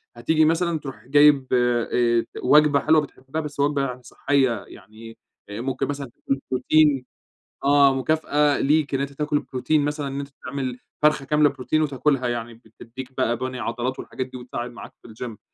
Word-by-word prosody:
هتيجي 155 Hz, +7 st, +2 dB
مثلًا 165 Hz, 0 st, +1 dB
تروح 130 Hz, -6 st, -9 dB
جايب، 145 Hz, -1 st, +5 dB
آآ 120 Hz, -1 st, +2 dB
ت -, -, -14 dB
وجبة 150 Hz, +1 st, +5 dB
حلوة 155 Hz, +1 st, +4 dB
بتحبها، 140 Hz, +2 st, -6 dB
بس 145 Hz, -2 st, -8 dB
وجبة 145 Hz, 0 st, +2 dB
يعني 125 Hz, 0 st, -8 dB
صحية 125 Hz, -4 st, 0 dB
يعني 115 Hz, +1 st, -13 dB, 0.3 s
آآ، 105 Hz, +3 st, -5 dB
ممكن 135 Hz, +1 st, -2 dB
مثلًا 140 Hz, -3 st, -5 dB
تكون 135 Hz, +3 st, -3 dB
بروتين، 140 Hz, +1 st, +3 dB, 0.6 s
آه، 140 Hz, -1 st, +5 dB
مكافأة 150 Hz, +1 st, +1 dB
ليك 150 Hz, 0 st, +1 dB
إن 135 Hz, -, 0 dB
أنت 140 Hz, 0 st, -3 dB
تأكل 150 Hz, +1 st, -1 dB
بروتين 145 Hz, +4 st, 0 dB
مثلًا 145 Hz, -1 st, -2 dB
إن 135 Hz, +1 st, -5 dB
أنت 140 Hz, -, -6 dB, 0.2 s
تعمل 130 Hz, -1 st, -4 dB, 0.2 s
فرخة 150 Hz, -2 st, +3 dB
كاملة 150 Hz, +1 st, +3 dB
بروتين 140 Hz, +3 st, -1 dB
وتاكلها 135 Hz, -2 st, 0 dB
يعني 120 Hz, -1 st, -4 dB
بتدّيك 120 Hz, +3 st, -11 dB
بقى 120 Hz, -2 st, +1 dB
بَني 130 Hz, +1 st, -4 dB
عضلات 120 Hz, +3 st, -3 dB
والحاجات 130 Hz, -, -5 dB
دي 130 Hz, -, -10 dB
وتساعد 120 Hz, -1 st, -6 dB
معاك 120 Hz, -, -11 dB
في -, -, -14 dB
الجيم 115 Hz, -1 st, -8 dB
135 Hz, 175 wpm, -23 LUFS, 125-145 Hz, 0.6 s, جايب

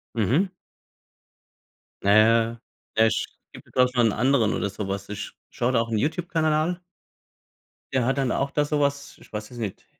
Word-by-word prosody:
Mhm. 125 Hz, -, +2 dB, 1.5 s
Naja, 115 Hz, +3 st, +4 dB, 0.3 s
Pech. 110 Hz, 0 st, +4 dB, 0.4 s
Gibt -, -, -13 dB
doch 125 Hz, 0 st, +5 dB
schon 120 Hz, -2 st, +4 dB
'n -, -, 0 dB
anderen 125 Hz, -2 st, +2 dB
oder -, -, -1 dB
sowas. 100 Hz, 0 st, -5 dB
Ich 105 Hz, -1 st, -6 dB, 0.2 s
schaue 120 Hz, +2 st, 0 dB
da 120 Hz, -, +3 dB
auch 115 Hz, 0 st, -2 dB
'n 110 Hz, -, +1 dB
YouTube-Kanal 160 Hz, +3 st, 0 dB
an 165 Hz, +4 st, 0 dB, 1.1 s
der 130 Hz, -2 st, +2 dB
hat 135 Hz, +1 st, +1 dB
dann 135 Hz, -2 st, +1 dB
auch 140 Hz, 0 st, -1 dB
da 150 Hz, -, +1 dB
sowas, 140 Hz, -1 st, -1 dB
ich -, -, -18 dB
weiß 105 Hz, 0 st, -5 dB
es 125 Hz, -, -10 dB
nicht: 105 Hz, -5 st, -5 dB
120 Hz, 160 wpm, -25 LUFS, 110-140 Hz, 1.5 s, doch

